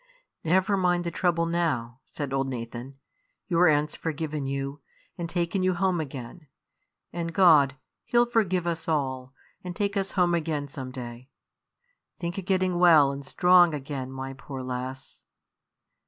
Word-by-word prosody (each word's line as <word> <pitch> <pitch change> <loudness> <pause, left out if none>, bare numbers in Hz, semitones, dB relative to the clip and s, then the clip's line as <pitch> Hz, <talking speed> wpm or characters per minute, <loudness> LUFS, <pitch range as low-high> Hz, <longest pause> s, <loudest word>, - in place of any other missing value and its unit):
"Never 190 +4 +2
mind 175 -2 +2
the 170 - -3
trouble 170 0 +1
now, 165 -6 0
Rhoda," 115 +1 -13
said 140 -3 -5
old 135 0 0
Nathan. 125 +1 -6 0.5
"Your 175 -2 +4
aunt's 150 -1 +2
forgiven 155 -3 -3
you, 140 +1 -4 0.3
and 170 -2 -5
taken 175 +2 -1
you 185 -1 +2
home 180 -1 +1
again; 140 +2 -8 0.7
and 170 -1 -3
God, 155 -7 +5 0.3
He'll 240 0 +3
forgive 195 -7 +1
us 170 -1 -3
all, 130 -5 -1 0.3
and 180 -1 -6
take 200 +1 -1
us 195 -1 -2
home 175 -2 +2
again 155 -3 -1
some 135 -2 -7
day. 125 0 -8 0.9
Think 170 +2 -4
o' - - -3
getting 185 -1 0
well 160 -6 +6
and 140 0 -6
strong 175 +2 +5
again, 135 -2 -5
my 135 0 -6
poor 135 -1 -8
lass." 130 +1 -6
160 Hz, 155 wpm, -27 LUFS, 135-175 Hz, 0.9 s, well